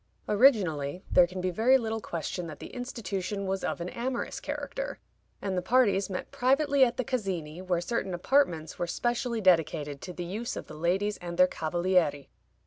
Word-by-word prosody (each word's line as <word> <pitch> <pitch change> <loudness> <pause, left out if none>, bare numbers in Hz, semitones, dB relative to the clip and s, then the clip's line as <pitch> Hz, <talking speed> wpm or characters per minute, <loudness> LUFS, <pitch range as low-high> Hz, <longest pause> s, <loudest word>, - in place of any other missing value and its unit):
Originally, 185 - +3
there 180 -1 +6
can 185 +1 -6
be 185 0 0
very 235 +8 +5
little 225 -2 -3
question 170 0 -4
that 155 -2 -8
the - - -10
institution 205 -5 -4
was 190 0 -2
of - - -2
an 175 - -3
amorous 240 +3 -3
character, - - -4 0.5
and 195 -2 -1
the 180 - 0
parties 205 -2 +3
met 185 - -5
privately 275 +1 +3
at 245 -1 +2
the 255 - 0
Casini, 185 -10 -3
where 180 -2 0
certain 195 -2 -2
apartments 175 - +1
were 175 - -1
specially 240 +3 -1
dedicated 155 -6 +2
to 185 - -6
the 175 0 -5
use 215 +7 -4
of - - -6
the - - -11
ladies 185 +6 0
and 175 -1 -7
their 180 - +8
cavalieri. 170 -4 0
190 Hz, 180 wpm, -29 LUFS, 175-235 Hz, 0.5 s, their